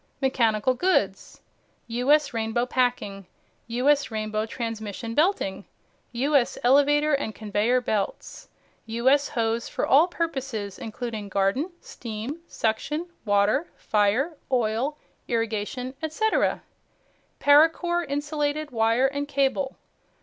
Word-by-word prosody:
MECHANICAL 245 -3 +2
GOODS 245 - 0 0.4
"U.S." 255 +6 +2
Rainbow 225 +1 0
Packing. 245 -7 -1 0.4
"U.S." 275 +5 +2
Rainbow 215 -1 -2
Transmission 225 -1 -5
Belting. 295 - +1 0.5
"U.S." 265 +1 +1
Elevator 290 +4 +4
and 250 -6 -1
Conveyor 220 +4 +1
Belts. 210 -4 -3 0.4
"U.S." 260 +6 +2
Hose 230 0 -1
for - - -1
all 300 +6 +5
purposes, 265 - -4
including 220 -2 -5
Garden, 200 - +1
Steam, 235 +6 -6
Suction, 300 +10 -2 0.2
Water, 205 +9 +2
Fire, 220 +10 +1 0.2
Oil, 245 +4 0 0.3
Irrigation, 230 +2 -2
etc. 320 +8 0 0.8
Paracore 325 +4 +4
Insulated 295 0 -2
Wire 230 +2 +2
and 285 +1 -1
Cable. 275 -1 0
250 Hz, 100 wpm, -25 LUFS, 220-290 Hz, 0.8 s, all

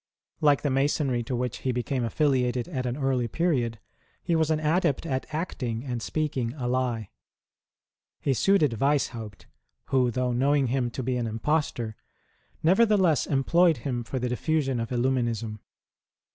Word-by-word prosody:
Like 145 -2 +3
the 145 - +1
Masonry 135 -2 +1
to 125 - -2
which 125 -1 -2
he 130 - -1
became 125 +1 -1
affiliated 125 -1 +1
at 130 -1 -3
an 125 +2 -2
early 135 -4 0
period, 120 -6 0 0.4
he 170 - +1
was 160 -1 +2
an 155 -1 +2
adept 160 -1 +1
at 130 -1 -3
acting 130 -8 -3
and 125 -4 -4
speaking 135 -6 -2
a 125 -5 -3
lie. 120 -4 -1 1.1
He 140 - +1
suited 150 - +2
Weishaupt, 125 -7 -1 0.4
who, 130 -2 +3
though 125 +1 -1
knowing 135 +1 +2
him 125 -1 0
to 130 +2 -5
be 125 +1 -1
an 120 -2 -1
impostor, 115 -1 -1 0.7
nevertheless 190 -2 +4
employed 160 +4 +3
him 125 -3 -1
for 130 - -4
the 125 0 -1
diffusion 135 0 0
of 115 -1 -3
Illuminism 120 -4 -1
130 Hz, 150 wpm, -27 LUFS, 120-150 Hz, 1.1 s, nevertheless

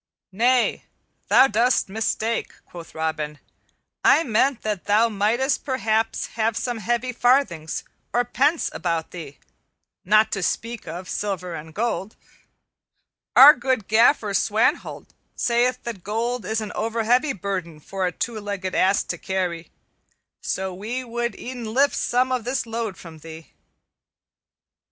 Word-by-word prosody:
"Nay, 245 +5 +2 0.4
thou - - +7
dost 245 +1 +2
mistake," 220 +2 -2
quoth 170 -2 -12
Robin, 155 -2 -3 0.7
"I 325 - +5
meant 255 +1 +1
that 210 -4 -3
thou 220 +3 +3
mightest 230 +6 0
perhaps 225 -5 0
have 225 0 0
some 240 0 -2
heavy 240 +3 -1
farthings 245 - +1 0.3
or 245 0 +1
pence 290 +7 +1
about 165 -1 -2
thee, 160 -6 -9 0.7
not 215 +3 +4
to 195 - -2
speak 230 +5 -3
of 180 +2 -6
silver 180 -4 -3
and 160 0 -8
gold. 215 +1 -2 1.2
Our 285 +3 +11
good 255 -5 -1
Gaffer 220 -1 +3
Swanthold 220 - 0 0.3
sayeth 250 +1 +1
that 220 -7 -6
gold 230 +2 -2
is 220 +3 -1
an 215 - -5
overheavy 230 +3 0
burden 175 -5 -4
for 190 +4 -3
a - - -2
two 225 +5 -4
legged 200 -3 -4
ass 195 +1 +3
to - - -5
carry; 180 -3 -3 0.7
so 190 0 -3
we 225 +7 -4
would 240 0 -3
e'en 240 -3 -6
lift 280 +2 +4
some 255 +1 +1
of 250 -3 0
this 250 +2 -2
load 225 -3 -4
from 165 -2 -12
thee." 160 +1 -11
220 Hz, 135 wpm, -23 LUFS, 190-245 Hz, 1.2 s, Our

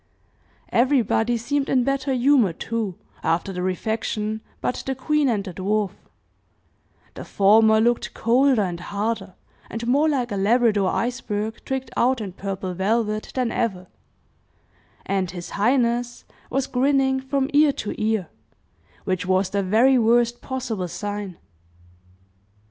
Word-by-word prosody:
Everybody 240 -2 +2
seemed 275 +4 -1
in 255 -2 +3
better 275 +1 -1
humor, 255 - +3
too, 220 0 -3 0.3
after 170 +4 0
the 180 - -4
refection, 215 +3 -2 0.2
but - - -2
the 265 - -1
queen 300 +1 +1
and 210 -4 0
the 190 -2 -7
dwarf 200 +2 -1 1.2
the - - -8
former 220 +2 +4
looked 240 +2 +1
colder, 245 0 +3
and 175 -3 -3
harder, 200 0 -3 0.3
and 230 +1 -5
more 285 +6 +3
like 250 -5 -1
a 200 - -2
Labrador 210 -1 +3
iceberg 225 -3 -3
tricked 265 -1 -3
out 255 +1 +2
in 200 -4 -5
purple 190 -1 -4
velvet, 215 +3 -1
than 255 -3 0
ever, 190 -6 -2 1.2
and 190 -2 -1
his 175 -1 -8
highness 240 +2 0 0.2
was 270 0 0
grinning 265 0 +2
from 265 0 -1
ear 295 0 +5
to 210 - -4
ear 215 -5 0 0.8
which 185 -2 -2
was 185 0 +1
the 200 - 0
very 230 +7 +4
worst 240 +1 +2
possible 240 -8 -3
sign. 205 0 -5
225 Hz, 130 wpm, -23 LUFS, 200-255 Hz, 1.2 s, ear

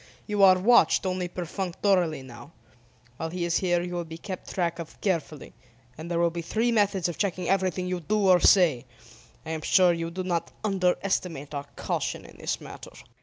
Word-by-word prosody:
You 210 -2 -1
are 190 -1 +7
watched 210 +1 +4
only 185 -1 -1
perfunctorily 180 -2 -1
now. 120 +4 -12 0.6
While 165 - -4
he 175 +1 -3
is 170 0 +1
here 175 -2 +1
you 180 0 -5
will 175 -1 -2
be 165 0 -9
kept 185 +2 -7
track 170 -2 -1
of 165 - -9
carefully, 165 -6 -3 0.4
and 160 +4 -8
there 170 - -1
will 170 0 +2
be 170 0 -4
three 225 +8 0
methods 205 -5 +2
of 175 - -6
checking 185 -3 -1
everything 185 -1 0
you 180 0 -2
do 200 +5 0
or 180 -1 +6
say. 170 - +4 0.6
I 160 - -5
am 160 -1 -3
sure 180 +2 +4
you 165 0 -3
do 185 +2 -5
not 175 -2 -2
underestimate 180 -6 -1
our 140 -1 -4
caution - - -3
in - - -15
this - - -2
matter." - - -11
175 Hz, 190 wpm, -26 LUFS, 165-190 Hz, 0.6 s, are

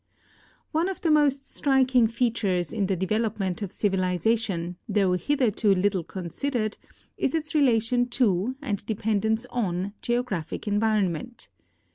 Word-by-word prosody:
One 330 +4 +1
of 385 - -6
the 330 - +2
most 285 -2 +3
striking 260 -4 +3
features 220 -7 0
in 205 -4 0
the 190 - +1
development 205 0 -1
of 200 -3 -4
civili 185 -3 0
zation, 190 -5 -1
though 195 -3 +2
hitherto 215 - +2
little 190 -1 +1
considered, 215 - -3 0.4
is - - 0
its 315 -1 -2
relation 245 -4 +3
to 235 -2 +1
and 205 -7 -2
dependence 220 +1 0
on 195 -4 -2
geographic 240 -9 -2
environment. 210 0 0
220 Hz, 125 wpm, -26 LUFS, 190-245 Hz, 0.4 s, most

